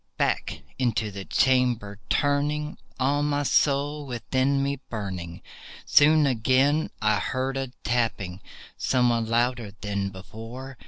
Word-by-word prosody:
Back - - -1 0.2
into 110 -4 0
the 95 -1 -7
chamber 120 -2 +1
turning, 145 +1 0 0.2
all 140 +3 +2
my 145 0 0
soul 145 +1 +1
within 130 +3 0
me 140 0 -1
burning, 95 -6 -5 0.4
Soon 150 +1 +6
I 140 - +3 0.9
heard 130 +6 -2
again 135 -1 -2
a 125 - -29
tapping, 105 -6 -1 0.4
somewhat 120 -3 +2
louder 120 -2 0
than 100 -2 -2
before. 115 +7 -9
125 Hz, 115 wpm, -26 LUFS, 110-140 Hz, 0.9 s, Soon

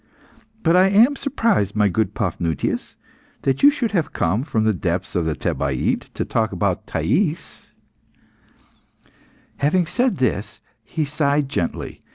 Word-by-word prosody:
But 165 +1 +4
I 185 +1 +6
am 230 +8 +5
surprised, 225 - 0
my 105 -1 +3
good 105 +1 -1
Paphnutius, 85 -6 -2 0.5
that 135 -1 0
you 285 - +9
should 270 -6 -1
have 175 -7 -1
come 90 +7 0
from 115 -6 -1
the 110 0 +2
depths 90 0 -3
of 85 -2 +1
the 80 -1 -1
Thebaid 70 -1 -1
to - - -2
talk - - 0
about - - -1
Thais." 160 - -1 1.9
Having 165 +6 +2
said 240 +9 0
this, 110 -6 -1 0.2
he 155 - -2
sighed 145 -1 0
gently. 85 - -3
135 Hz, 140 wpm, -21 LUFS, -, 1.9 s, you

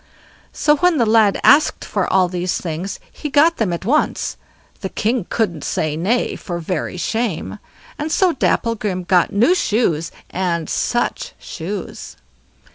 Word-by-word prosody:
So 300 0 +2
when 355 0 +3
the 235 - +3
lad 215 -2 +4
asked 300 +2 +4
for - - -1
all 190 -1 +4
these 180 0 -2
things, 175 +3 -4
he 300 - -6
got 310 +4 +4
them 215 -6 0
at 170 +2 -4
once—the 245 -6 -2
king 220 -1 -1
couldn't 175 -10 -1
say 155 -1 -1
nay 205 +10 0
for 175 -2 -5
very 170 +1 -3
shame; 220 -1 -2 0.4
and 305 +2 -3
so 365 0 +3
Dapplegrim 210 -8 0
got 175 -1 +3
new 235 - +4
shoes, 205 - 0 0.2
and 170 -3 -1
such 240 0 -1
shoes! 185 +3 -7
205 Hz, 140 wpm, -19 LUFS, 175-245 Hz, 0.4 s, lad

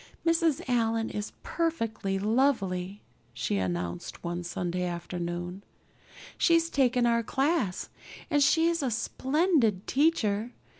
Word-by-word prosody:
"Mrs. 330 -1 +2
Allan 225 -2 +1
is 210 0 -4
perfectly 230 -12 -1
lovely," 205 -4 0 0.3
she 115 -3 -1
announced 85 -2 -3
one 175 0 -3
Sunday 175 +1 -2
afternoon. 175 +1 -4 0.8
"She's 330 -1 +3
taken 250 -3 +3
our 235 0 +3
class 265 - 0 0.4
and 295 -3 +2
she's 330 +3 +3
a 270 - 0
splendid 255 - +1
teacher. 245 -7 +1
225 Hz, 105 wpm, -28 LUFS, 180-285 Hz, 0.8 s, She's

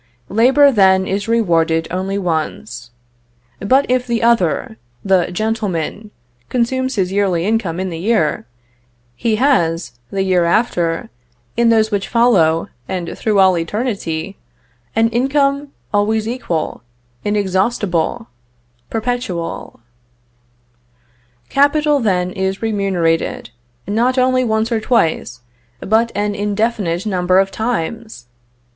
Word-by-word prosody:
Labor, 265 +7 +5
then, 190 -4 +4
is 200 +2 -2
rewarded 165 -8 +1
only 190 +2 -2
once. 160 - -3 0.7
But 260 +7 +3
if 250 0 0
the 235 -1 -1
other, 185 - +1 0.3
the 190 -2 +3
'gentleman,' 210 -1 -2 0.4
consumes 260 +2 0
his 190 -3 0
yearly 190 -4 +1
income 205 -6 -1
in 190 -1 -3
the 165 - -5
year, 180 - 0 0.7
he 220 - 0
has, 165 - +1
the 195 -1 -1
year 185 -2 +2
after, 170 - 0 0.4
in 235 -1 +3
those 220 -1 +3
which 200 -1 -1
follow, 185 -10 +3 0.2
and 175 -3 -4
through 215 -2 0
all 190 -1 +5
eternity, 190 -1 -3 0.6
an 225 0 +4
income 275 +4 +1 0.3
always 215 +1 +1
equal, 200 -10 -3 0.4
inexhaustible, 205 0 0 0.6
perpetual. 225 - -4 1.7
Capital, 290 +1 +3
then, 185 -6 0
is 190 +2 -3
remunerated, 190 - -1 0.4
not 235 +5 +1
only 255 0 +3
once 220 0 0
or 230 - +1
twice, 160 - 0 0.4
but 225 - +1
an 205 0 0
indefinite 205 -3 -1
number 185 -3 +1
of 195 0 +3
times! 220 - -4
205 Hz, 110 wpm, -17 LUFS, 180-230 Hz, 1.7 s, Labor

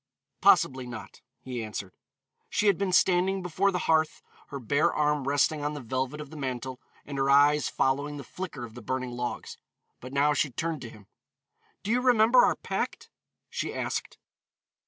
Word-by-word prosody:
"Possibly 130 -1 +4
not," 120 -3 -9 0.2
he 125 -3 -5
answered. 105 -3 -6 0.6
She 205 - 0
had 200 -2 +5
been 195 -2 0
standing 185 +1 +3
before 185 +3 +1
the 180 - -1
hearth, 160 -1 +2 0.2
her 140 - -6
bare 140 +5 +2
arm 150 -2 0
resting 145 +1 +2
on 150 +1 -2
the - - -5
velvet 130 +3 -3
of 150 -1 -8
the - - -10
mantel, 130 -2 -4 0.2
and 140 -1 -5
her 135 0 +1
eyes 145 +2 +5
following 140 +2 0
the 140 - -7
flicker 150 -4 -6
of 115 - -13
the 120 - -10
burning 130 +3 -3
logs 120 0 -5 0.4
but 130 - -9
now 145 +2 +3
she 145 +1 +1
turned 160 +5 -3
to 120 - -7
him. 105 -2 -15 0.8
"Do 210 - -2
you 250 +2 +2
remember 245 -1 +5
our 245 - +3
pact?" - - -4 0.4
she - - -4
asked. - - -3
145 Hz, 175 wpm, -28 LUFS, 130-165 Hz, 0.8 s, had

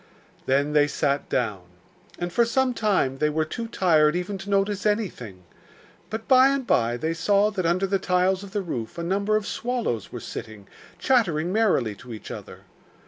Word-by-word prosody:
Then 140 +3 +1
they 145 -1 +4
sat 140 -1 -1
down, 105 -7 -1 0.6
and 175 0 -4
for 235 - +4
some 255 +2 +1
time 190 - 0
they 150 - +2
were 155 +1 0
too 230 +9 -5
tired 160 -7 +3
even 190 +2 -3
to 195 +1 -8
notice 200 0 +1
anything; 180 - -2 0.7
but 220 +1 -5
by 260 0 +7
and 275 -1 0
by 120 - +1
they 160 +6 -2
saw 200 +5 +2
that 185 -5 -1
under 180 +3 +1
the 195 0 0
tiles 185 0 +1
of 200 - -9
the 205 0 -3
roof 120 -9 -5
a 170 - -3
number 200 +4 0
of 215 -1 0
swallows 235 - -3
were - - -6
sitting, 105 -3 -8 0.3
chattering 180 -10 +1
merrily 195 - +2
to 125 -2 -9
each 110 - -10
other. - - -9
185 Hz, 185 wpm, -25 LUFS, 145-210 Hz, 0.7 s, by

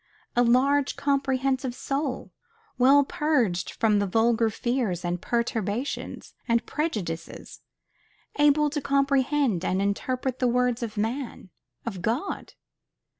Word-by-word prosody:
A 240 - +4
large, 265 +4 +3
comprehensive 270 -2 0
soul, 275 0 -3 0.5
well 275 +3 +6
purged 250 - 0
from 215 -2 +2
vulgar 225 +3 +2
fears 220 -6 -2
and 175 0 -2
perturbations 235 +1 -2
and 235 0 +2
prejudices; 190 - -4 0.8
able 295 0 +4
to 295 -1 -2
comprehend 275 - +1
and 185 0 0
interpret 255 +6 -1
the 250 - +2
works 250 0 +1
of 225 -2 -5
man 225 -3 -3 0.3
of 195 -6 -5
God. 235 - -3
250 Hz, 110 wpm, -26 LUFS, 220-275 Hz, 0.8 s, well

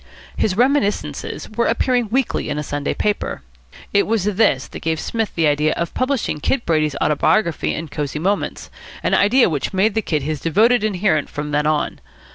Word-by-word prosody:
His 190 -2 0
reminiscences 215 - 0
were 235 +2 0
appearing 245 -4 +1
weekly 260 +2 0
in 145 - -2
a 150 - -2
Sunday 145 0 -3
paper. 205 - -2 0.5
It 200 0 +3
was 220 -3 +1
this 200 - +2
that - - -8
gave 160 -1 -1
Psmith 225 +3 -3
the 165 - +2
idea 150 +1 +2
of 170 -1 -3
publishing 255 - -1
Kid 235 - -1
Brady's 155 -3 +1
autobiography 170 +3 +1
in 160 +1 -5
Cosy 150 -1 -4
Moments, 195 +6 -2 0.3
an - - +1
idea 240 +6 +5
which 155 +3 -2
made 200 +3 +3
the 220 - +1
Kid 155 -8 -1
his 155 0 -2
devoted 215 - +3
adherent 190 -7 +1
from 150 0 -5
then 150 +1 +1
on. 155 -1 0
180 Hz, 180 wpm, -20 LUFS, 150-220 Hz, 0.5 s, idea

